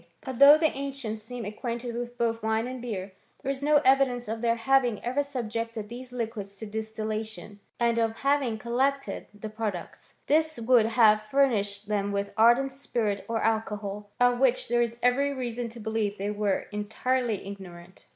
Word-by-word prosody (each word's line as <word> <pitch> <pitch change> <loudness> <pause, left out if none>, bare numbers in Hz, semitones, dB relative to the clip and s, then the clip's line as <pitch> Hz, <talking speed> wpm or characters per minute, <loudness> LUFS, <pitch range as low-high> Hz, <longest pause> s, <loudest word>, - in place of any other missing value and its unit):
But 260 -3 -6
though 285 +2 +10
the 315 -1 +1
ancients 270 -6 -4
seem 240 +2 -7
acquainted 235 +3 -4
with 240 0 -5
both 230 -1 0
wine 220 +1 0
and 255 0 -6
beer, 200 -5 -4 0.3
there 275 - 0
is 270 0 -5
no 300 +1 +3
evidence 260 -2 +3
of 225 +1 -4
their 230 -1 +2
having 245 -2 +2
ever 255 +4 +1
subjected 230 -5 -4
these 250 +1 -8
liquids 220 -5 -5
to 220 - -7
distillation, 215 -2 -5 0.2
and 235 -1 +2
of 225 -1 -1
having 275 -5 +1
collected 265 +4 -1
the 210 +1 -8
products. 215 -5 -6
This 315 +1 +2
would 230 -1 +4
have 220 -2 +5
fur 275 +6 +3
nished 205 -3 -2
them 205 -1 -1
with 200 0 -2
ardent 240 +5 +5
spirits 230 -7 -2
or 225 -1 -1
alcohol, 210 -2 -2
of 245 0 +4
which 255 -3 +2
there 240 0 +3
is 235 0 -1
every 275 +3 +3
reason 245 -2 -3
to 235 +1 -10
believe 220 -2 -2
they 200 +2 -2
were 205 -2 0
entirely 220 +2 -1
ig 200 0 -7
norant. 175 0 -13
230 Hz, 180 wpm, -27 LUFS, 215-250 Hz, 0.3 s, though